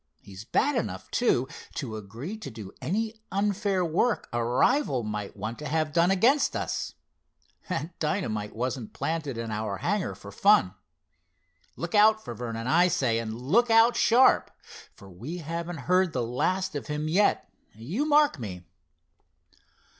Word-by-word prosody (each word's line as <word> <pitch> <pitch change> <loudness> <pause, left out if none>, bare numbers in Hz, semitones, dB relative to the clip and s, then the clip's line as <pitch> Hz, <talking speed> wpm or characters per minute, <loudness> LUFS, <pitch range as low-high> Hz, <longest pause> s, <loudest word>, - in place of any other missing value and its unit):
He's 100 +1 -11
bad 285 - +1
enough, 240 - -3
too, 130 - +2 0.3
to 115 -6 -4
agree 115 - -7
to 215 - -8
do 110 -4 -9
any 220 +5 -2
unfair 200 -1 0
work 185 +8 0
a 120 0 0
rival 125 - +2
might 105 -1 -5
want 110 +4 -5
to 150 - -5
have 155 0 -1
done 170 +1 +4
against 235 +10 +3
us. - - -3 0.7
That 165 -1 -4
dynamite 110 - -2
wasn't 125 -1 -3
planted 155 -6 -3
in 115 -1 -4
our 105 -2 -3
hangar 205 - -1
for - - -11
fun. 200 - +4 1.0
Look 170 0 -5
out 220 +1 +5
for - - -5
Vernon, 115 -1 -5
I 170 +7 +4
say, 130 -10 +1
and 115 -1 -4
look 220 - +2
out 225 +1 +5
sharp, 245 +3 +4 0.5
for 100 - -14
we 120 - -7
haven't 170 -1 -5
heard 185 -1 +2
the 125 - -1
last 165 +11 -1
of 145 - -5
him 150 +1 -3
yet, 195 +6 +2 0.3
you 160 - -3
mark 295 - +4
me!" 95 -6 -6
155 Hz, 155 wpm, -27 LUFS, -, 1.0 s, out